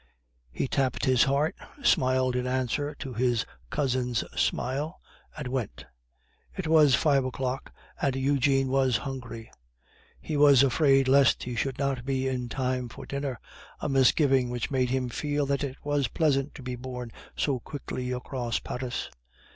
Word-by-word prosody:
He 130 - -2
tapped 130 -2 0
his 130 -2 +4
heart, 140 +3 +1 0.3
smiled 130 - +3
in 125 0 -1
answer 130 +3 -1
to 135 -3 -7
his 120 -1 +1 0.2
cousin's 125 - 0
smile, 145 +7 -1 0.4
and 150 -3 -4
went. 125 - -4 0.7
It 190 - -3
was 155 -4 +6
five 140 0 +3
o'clock, 130 0 -3 0.3
and 135 -2 +1
Eugene 135 0 +2
was 130 -3 +2
hungry; 115 -4 -7 0.7
he 155 - -4
was 140 -2 +7
afraid 135 0 +4
lest 135 -1 +4
he 125 - -4
should 130 +3 -2
not 135 -3 -1
be 135 0 -1
in 125 -2 -2
time 125 -1 -2
for - - -10
dinner, 140 -4 -4 0.4
a - - -2
misgiving 135 -1 +3
which 120 +1 -3
made 130 -2 +1
him 130 0 0
feel 145 +4 -1
that 140 +1 0
it 135 -2 -3
was 145 -2 +1
pleasant 145 -3 0
to 135 - -9
be 125 0 -4
borne 125 -1 -7 0.2
so 135 -4 0
quickly 125 -1 -5
across 125 -1 -2
Paris. 125 -1 -4
130 Hz, 155 wpm, -27 LUFS, 125-140 Hz, 0.7 s, was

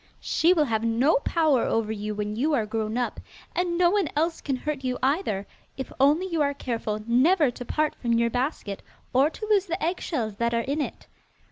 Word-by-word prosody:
She 335 - +2
will 320 -5 +4
have 225 -3 -1
no 235 +7 +3
power 300 -3 +2
over 225 -1 0
you 210 0 -4
when 210 0 -3
you 295 +7 +1
are 225 -5 +1
grown 220 +1 -2
up, 245 - -2 0.3
and 350 -1 0
no 350 -1 +4
one 400 -6 +1
else 325 +2 0
can 275 - -1
hurt 285 +1 -4
you 255 -1 -1
either, 260 - 0 0.3
if 265 - -6
only 295 +7 +4
you 335 -4 -1
are 285 -1 +1
careful 225 -5 -3
never 275 +5 +4
to 245 - -8
part 305 +5 0
from 235 -2 -2
your 235 0 +2
basket, 245 -6 -2 0.3
or 270 +4 +4
to 430 - -7
lose 405 -2 +3
the 340 +2 -2
eggshells 290 - -2
that 235 +1 0
are 230 - +2
in 285 +5 -1
it. - - -5
265 Hz, 210 wpm, -26 LUFS, 230-320 Hz, 0.3 s, will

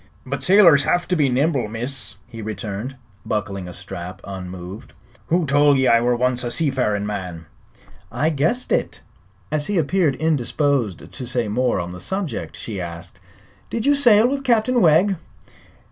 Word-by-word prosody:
"But 140 +2 -4
sailors 180 -7 +6
have 175 0 +1
to 180 - +2
be 145 -5 +2
nimble, 135 -2 +1
miss," 120 0 -6
he 115 -1 -10
returned, 110 +3 -5 0.3
buckling 100 -3 -3
a - - -7
strap 95 -1 -8
unmoved. 95 +1 -8 0.3
"Who 175 0 +2
tol' 145 0 +4
ye 130 - +2
I 115 -1 +5
were 120 0 +2
once 125 0 0
a 120 - -2
sea 150 +3 +1
farin' 105 -6 0
man?" 90 -5 -5 0.7
"I 155 +2 0
guessed 160 - -1
it." - - -1 0.5
As 150 -1 0
he 205 - 0
appeared 165 -2 +2
indisposed 140 - 0
to 125 -3 -7
say 120 -2 0
more 120 +1 0
on 85 0 -4
the 90 - -8
subject 190 - -3
she 100 -5 -5
asked: 85 +1 -8 0.5
"Did 230 - -3
you 285 - +5
sail 240 -6 +5
with 275 +1 -2
Captain 240 -1 +2
Wegg?" 180 +4 +4
130 Hz, 165 wpm, -21 LUFS, 105-165 Hz, 0.7 s, sailors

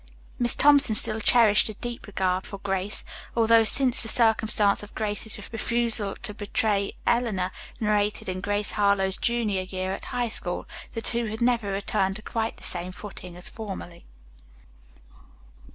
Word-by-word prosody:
Miss 240 -1 +1
Thompson 285 -5 +4
still 215 +1 +5
cherished 220 -2 +4
a 215 - -7
deep 240 +1 -7
regard 190 -2 -1
for 200 - -7
Grace, 195 +1 -1 0.3
although, 230 0 +5
since 255 +2 +2
the 225 - +3
circumstance 220 -3 +3
of 210 - -12
Grace's 215 0 -1
refusal 230 -3 +2
to 215 -3 -3
betray 205 -1 -1
Eleanor, 215 -7 0 0.3
narrated 210 -1 0
in 185 0 -4
"Grace 205 +1 -1
Harlowe's 200 -2 +2
Junior 225 -5 -1
Year 185 0 -4
at - - -6
High 245 -2 -2
School," 180 -4 -1 0.3
the 225 - -4
two 235 -1 +1
had 220 +1 -5
never 235 -4 +1
returned 195 -1 -1
to 215 - -9
quite 225 0 -3
the - - -14
same 180 0 -2
footing 185 -2 -10
as 180 - -4
formerly. 190 -6 -8
210 Hz, 150 wpm, -25 LUFS, 195-230 Hz, 0.3 s, still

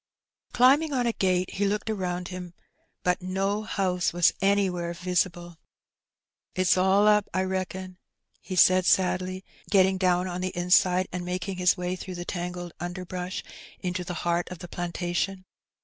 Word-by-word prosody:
Climbing 280 +5 +4
on 250 -2 +1
a 235 - +1
gate, 185 -2 0
he 200 +1 0
looked 210 +2 -2
around 180 -4 -2
him, 180 -2 -8 0.5
but 180 +1 +1
no 195 +3 -1
house 185 -4 0
was 175 0 +3
anywhere 190 -3 +1
visible. 175 -1 -2 1.0
''It's 185 -1 +3
all 190 +3 +4
up, 210 -1 +4
I 185 - +2
reckon," 185 0 -4 0.4
he 185 - -6
said 185 0 +5
sadly, 185 +1 +1 0.2
getting 190 -1 +4
down 180 -1 +2
on 180 0 -4
the 185 -1 -3
inside 180 +1 +3
and 180 -1 -4
making 180 +1 -4
his 180 +1 +3
way 180 0 -2
through 185 0 -7
the 175 0 -6
tangled 175 -1 -5
under 175 +2 -5
growth 180 0 -5 0.3
into 180 0 -3
the 175 -1 -5
heart 175 0 0
of 180 - -7
the 175 - -9
plantation. 175 +2 -3
185 Hz, 160 wpm, -27 LUFS, 180-190 Hz, 1.0 s, said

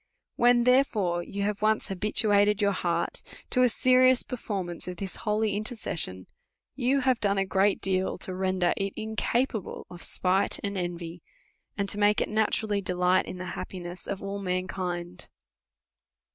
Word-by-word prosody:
When, 240 0 +4
therefore, 220 -9 +2
you 200 +3 -4
have 205 0 -2
once 215 0 +1
habituated 205 +1 +2
your 200 -1 +3
heart 170 -3 -1 0.3
to 255 - +3
a 250 - +5
serious 255 +1 +4
performance 190 -9 -4
of 180 -1 -5
this 190 0 -5
holy 210 -1 0
intercession, 205 - -2 0.5
you 270 +1 +1
have 255 -2 +2
done 200 -1 +1
a 195 - +2
great 195 +1 +2
deal 190 -1 0
to 185 - -6
render 185 -1 +1
it 195 0 -2
incapable 220 0 -2
of 175 0 -10
spite 185 +2 +1
and 200 0 -2
envy, 175 -2 -4 0.6
and 200 -1 -1
to 205 - -1
make 205 0 +4
it - - -1
naturally 215 -1 0
delight 180 0 +2
in 185 - -6
the 185 - -6
happiness 175 -1 -7
of 200 -1 -4
all 200 0 -4
mankind. 180 -1 -3
200 Hz, 155 wpm, -27 LUFS, 180-215 Hz, 0.6 s, a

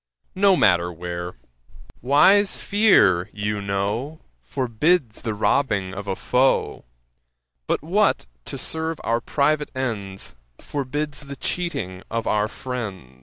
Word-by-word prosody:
No 195 -1 +4
matter 90 - +3
where; 85 +1 -6 0.7
wise 190 - +5
fear, 105 - +4
you 105 0 -2
know, 100 +10 -2 0.2
Forbids 125 - 0
the 110 -2 -3
robbing 100 -4 +1
of 100 +1 -7
a 95 - -1
foe; 130 +6 +1 0.8
But - - 0
what, 195 +6 +2 0.2
to - - -6
serve 160 -1 -2
our 115 +1 0
private 150 +3 +1
ends, 100 -7 -3 0.2
Forbids 145 +1 -4
the 140 - -6
cheating 125 - -3
of 115 0 -2
our 105 0 +1
friends?' 100 - -6
115 Hz, 120 wpm, -23 LUFS, 100-150 Hz, 0.8 s, wise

